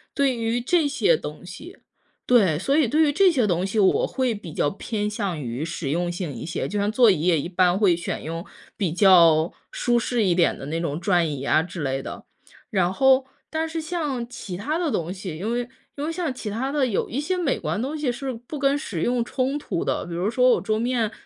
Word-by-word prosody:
对 275 -3 +2
于 230 +1 -1
这 310 +5 +2
些 400 - +3
东 - - -7
西 - - -10 0.5
对， 200 -11 +4
所 275 +10 +1
以 305 -5 +4
对 300 +7 +2
于 295 - +3
这 380 +3 +5
些 255 -8 +2
东 180 -1 0
西， 195 +3 -3
我 190 -2 +4
会 255 -2 0
比 180 -6 -9
较 145 - +1
偏 210 +1 -3
向 200 -6 -3
于 125 +2 -4
实 165 -3 -4
用 175 +2 0
性 175 -3 -4
一 115 - -7
些， 165 - -3
就 210 - -3
像 205 +1 +1
座 240 0 +5
椅 170 -6 -1
也 170 -1 +3
一 170 - -5
般 180 0 +3
会 195 -5 +4
选 170 - -4
用 165 +3 -5 0.3
比 185 -7 -1
较 170 -4 +5 0.2
舒 240 -1 +1
适 235 -1 0
一 180 -4 +2
点 175 -1 +3
的 135 - -8
那 160 +3 -2
种 160 -2 -2
转 175 -2 +2
椅 140 -2 -5
啊 155 +3 +3
之 175 0 -7
类 135 -1 -2
的。 - - -8 0.4
然 185 -3 +1
后， 265 +4 +4 0.2
但 320 0 -2
是 320 0 -4
像 305 -7 -3
其 195 -6 -7
他 285 - -2
的 340 -4 -1
东 170 -5 -2
西， 185 -3 -6
因 215 +5 -2
为 240 0 -1 0.3
因 285 - -3
为 320 - -2
像 330 -3 -2
其 235 -4 -6
他 255 +6 -2
的 285 -2 +2
有 225 -6 -1
一 255 - -2
些 345 +6 -1
美 340 -7 0
观 210 - -2
东 280 +5 -3
西 295 -5 0
是 260 +2 -4
不 245 +5 -8
跟 275 +1 +2
实 205 - -4
用 240 +2 +1
冲 265 +3 -1
突 230 - -3
的， - - -1
比 170 - -7
如 180 +4 -1
说 250 +2 +4
我 - - +2
桌 215 -1 0
面 230 -1 0
220 Hz, 255 characters per minute, -24 LUFS, 175-265 Hz, 0.5 s, 这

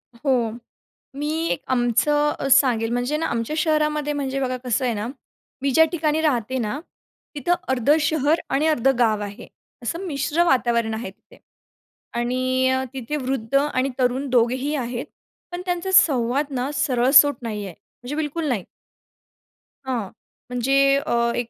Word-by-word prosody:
हो, 240 -3 0 0.7
मी 310 +3 -2
एक - - -2
आमचं 295 +5 +2
अ, 275 - -2
सांगेल 250 -4 +4
म्हणजे 245 +5 0
ना 325 - -1
आमच्या 235 +5 -2
शहरामध्ये 300 -2 +1
म्हणजे 275 -1 -2
बघा 255 -1 -1
कसं 255 +2 0
आहे 240 -3 0
ना, 210 +1 -3 0.6
मी 280 - +1
ज्या 320 +5 +6
ठिकाणी 310 -2 0
राहते 260 -4 0
ना, 230 +4 -2 0.6
तिथं 295 +5 +1
अर्धं 265 +3 +3
शहर 305 +1 +1
आणि 275 +4 +1
अर्धं 270 -4 +2
गाव 220 -3 +2
आहे. 205 +4 -8 0.4
असं 335 +10 -4
मिश्र 300 +1 0
वातावरण 235 -6 +1
आहे 220 -3 -5
तिथे 190 - -22 0.8
आणि 255 +2 +1
अ, 260 0 +1
तिथे 265 +2 -4
वृद्ध 260 -4 -3
आणि 275 -2 +1
तरुण 255 +2 0
दोघेही 255 +4 +1
आहेत. 245 -3 -3 0.5
पण 350 +1 -4
त्यांचा 355 +1 -2
संवाद 280 - +3
ना 255 +2 -1
सरळसोट 275 +1 +5
नाही 215 -3 -4
आहे 185 - -9
म्हणजे 250 +4 -10
बिलकुल 315 +1 -2
नाही. 220 -9 -1 1.2
हां 255 -3 -1 0.5
म्हणजे 275 +3 +3
अ, 280 - -2 0.2
एक 240 -1 -3
265 Hz, 150 wpm, -22 LUFS, 240-295 Hz, 1.2 s, ज्या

